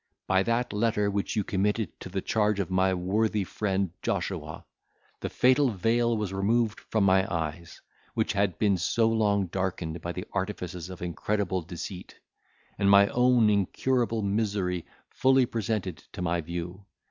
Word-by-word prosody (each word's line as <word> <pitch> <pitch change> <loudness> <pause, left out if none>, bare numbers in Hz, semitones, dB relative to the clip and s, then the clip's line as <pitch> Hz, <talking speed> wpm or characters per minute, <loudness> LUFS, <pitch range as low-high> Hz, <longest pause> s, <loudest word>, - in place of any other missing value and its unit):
By 95 0 +3
that 115 +3 0
letter, 105 -1 +1
which 100 +2 -2
you 105 - +1
committed 105 0 -1
to - - -8
the 95 +1 -3
charge 105 -2 +1
of 95 -1 -2
my 95 +1 +3
worthy 105 +3 0
friend 95 -1 -1
Joshua, - - -3 0.5
the - - -4
fatal 130 +2 +4
veil 115 +3 +1
was 105 -3 -3
removed 110 +3 +1
from 110 -2 -1
my 95 +2 +3
eyes, 85 0 -4 0.4
which - - 0
had 100 -4 0
been 100 -3 +2
so 110 +6 +2
long 105 -3 +2
darkened 85 -2 -3
by 85 - -3
the 90 +2 -6
artifices 90 -3 -4
of 90 -1 -8
incredible 95 +2 -1
deceit, 90 +2 -8 0.6
and 100 -1 +3
my 100 0 +7
own 125 -2 +4
incurable 115 +3 0
misery 100 -4 -1 0.2
fully 130 0 +4
presented 110 -7 -2 0.2
to - - -6
my 85 -1 0
view. 85 +4 -6
100 Hz, 155 wpm, -28 LUFS, 90-110 Hz, 0.6 s, my